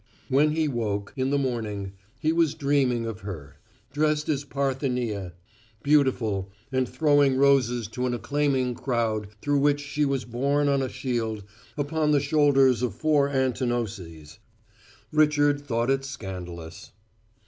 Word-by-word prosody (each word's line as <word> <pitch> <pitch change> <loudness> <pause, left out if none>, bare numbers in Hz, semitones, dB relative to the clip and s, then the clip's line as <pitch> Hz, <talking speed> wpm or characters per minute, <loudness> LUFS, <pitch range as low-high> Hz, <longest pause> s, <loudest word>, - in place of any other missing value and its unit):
When 145 +3 +3
he 160 -1 +1
woke, 105 -6 -2
in 130 -1 0
the 140 - +2
morning, 110 -7 -3 0.3
he 155 +1 +1
was 165 -3 +2
dreaming 135 -5 +1
of 115 -4 -5
her: 80 -8 -8 0.4
dressed 150 0 +1
as 145 -2 0
Parthenia, 125 -9 -2 0.5
beautiful, 125 -9 +2 0.2
and 130 -1 0
throwing 145 -3 +3
roses 125 -4 +3
to 125 +3 -2
an 120 - -1
acclaiming 135 -1 0
crowd 115 -4 -1 0.2
through 145 -1 +2
which 145 +1 +3
she 145 +1 -2
was 135 -2 0
borne 140 +5 0
on 140 -1 +2
a 130 - -2
shield 115 -6 -3 0.3
upon 150 +1 0
the 145 - +4
shoulders 135 -4 +3
of 120 -6 -1
four 145 -1 +2
Antinouses. 115 - -2 0.7
Richard 145 -2 +3
thought 120 -2 0
it 135 0 0
scandalous. 90 -10 -8
130 Hz, 135 wpm, -26 LUFS, 115-145 Hz, 0.7 s, the